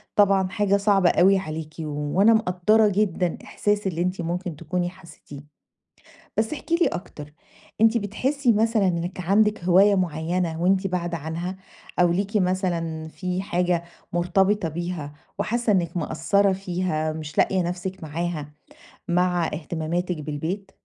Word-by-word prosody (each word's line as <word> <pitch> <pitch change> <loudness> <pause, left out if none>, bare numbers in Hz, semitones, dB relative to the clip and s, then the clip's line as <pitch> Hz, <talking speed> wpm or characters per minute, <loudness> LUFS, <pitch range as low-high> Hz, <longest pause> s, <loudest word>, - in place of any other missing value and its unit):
طبعًا 195 -2 +4
حاجة 200 -1 +2
صعبة 195 -3 +3
أوي 195 +2 +5
عليكِ، 155 -2 -6
و 150 +3 -1
أنا 225 +2 +7
مقدَّرة 215 +1 +3
جدًا 190 -4 0
إحساس 205 -1 -1
اللي 170 -2 -2
أنتِ 180 0 -1
ممكن 175 0 -3
تكوني 175 +2 -2
حسيتيه. 150 -5 -14 0.8
بس 220 +4 0
احكي 330 +2 -2
لي 345 - +3
أكتر. 150 -4 -6 0.5
أنتِ 225 +1 +5
بتحسي 245 +5 0
مثلًا 215 -2 +2
إنِك 175 +1 -2
عندِك 205 +1 +2
هواية 195 +3 +5
معينة 170 -1 -1
وأنتِ 190 +2 +2
باعدة 175 -2 -2
عنها؟ 165 +5 -4 0.4
أو 175 -1 +5
ليكِ 200 +4 -1
مثلًا 175 -4 -1
فيه 180 +2 -3
حاجة 175 -2 0 0.3
مرتبطة 180 +2 +2
بيها 170 -2 -4 0.3
وحاسة 230 +1 0
إنِك 180 -2 0
مقصّرة 190 +4 +2
فيها 180 -4 -2
مش 155 -1 -7
لاقية 190 -1 +3
نفسِك 180 +1 -4
معاها 155 -1 -4 0.6
مع 180 -1 +2
اهتماماتِك 170 +3 -3
بالبيت؟ 160 +7 -4
180 Hz, 135 wpm, -24 LUFS, 165-195 Hz, 0.8 s, أنا